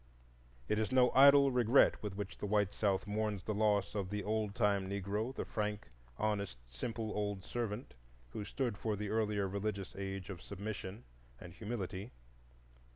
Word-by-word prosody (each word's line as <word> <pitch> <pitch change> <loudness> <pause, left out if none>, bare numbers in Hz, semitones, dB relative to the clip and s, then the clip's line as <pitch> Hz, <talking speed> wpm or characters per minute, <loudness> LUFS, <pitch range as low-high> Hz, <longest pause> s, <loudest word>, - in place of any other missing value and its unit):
It 105 - +1
is 110 +1 0
no 125 -1 +5
idle 140 +1 +8
regret 125 +1 +5
with 105 -3 -4
which 100 0 -5
the 105 - -3
white 105 -1 +2
South 100 -3 +1
mourns 105 -2 -1
the 110 - -2
loss 105 -1 +2
of 100 -3 -2
the 105 0 -2
old 105 -1 -1
time 100 -2 +2
Negro,—the 100 +6 -2
frank, 105 - -3 0.3
honest, 100 - -1
simple 110 - -4
old 100 -2 -2
servant 120 +2 -4 0.4
who 105 - -5
stood 115 0 -2
for 110 -2 -1
the 105 0 -4
earlier 105 -2 +1
religious 100 0 -3
age 95 0 -4
of 90 -2 -8
submission 100 +1 -6 0.4
and 90 - -10
humility. 105 0 -5
105 Hz, 160 wpm, -35 LUFS, 100-110 Hz, 0.4 s, idle